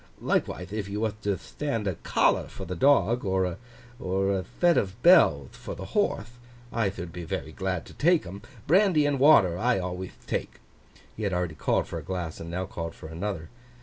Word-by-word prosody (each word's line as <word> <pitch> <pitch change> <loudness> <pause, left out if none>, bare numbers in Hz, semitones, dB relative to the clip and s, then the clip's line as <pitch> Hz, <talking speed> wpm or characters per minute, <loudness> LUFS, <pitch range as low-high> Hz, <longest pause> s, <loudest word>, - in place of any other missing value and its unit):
Likewithe 90 +2 -1
if 105 -2 -3
you 105 +1 -3
wath 110 -1 -2
to 100 -2 0
thtand 140 -8 -4
a 95 - 0
collar - - +1
for 95 - -8
the 90 +1 -4
dog, 120 - +3
or 95 -2 +1 0.6
a 95 +1 0 0.2
thet 175 -1 +5
of 100 +3 -1
bellth 80 - +5
for - - -7
the - - -7
horthe, 120 +1 -1 0.3
I 115 -4 +1
thould 90 -3 -7
be 90 - -6
very 80 - -4
glad - - -3
to - - -13
take 170 - +3
'em. 95 +3 -8 0.2
Brandy 180 -3 +4
and 145 -2 +1
water 105 - +6
I 120 0 +2
alwayth 90 0 -5
take.' - - -3 0.6
He - - -7
had 100 -3 -1
already 90 -2 -1
called - - 0
for - - -5
a - - -10
glass, 90 -4 -4
and 80 - -7
now 90 +2 -2
called 85 -2 -6
for 80 - -10
another. 85 -1 -4
95 Hz, 195 wpm, -27 LUFS, 90-120 Hz, 0.6 s, water